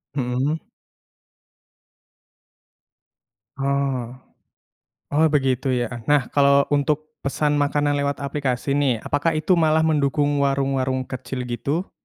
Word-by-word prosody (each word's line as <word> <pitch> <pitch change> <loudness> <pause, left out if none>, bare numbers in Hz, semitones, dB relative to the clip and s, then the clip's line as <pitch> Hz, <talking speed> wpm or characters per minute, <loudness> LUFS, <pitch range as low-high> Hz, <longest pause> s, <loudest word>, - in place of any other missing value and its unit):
Mhm. 135 +4 -2 2.9
Oh. 135 -3 -1 1.0
Oh 155 +3 +4
begitu 135 -3 +1
ya. 120 -1 -3
Nah 145 -3 +3
kalo 140 0 +4
untuk 150 +2 0
pesan 145 +2 0
makanan 145 0 +1
lewat 140 0 -1
aplikasi 140 -2 -2
nih, 130 -6 +1
apakah 155 +3 0
itu 155 +4 +2
malah 160 0 +3
mendukung 145 -2 +1
warung-warung 135 -2 0
kecil 130 0 -5
gitu? 140 - -3
140 Hz, 100 wpm, -22 LUFS, 130-145 Hz, 2.9 s, Oh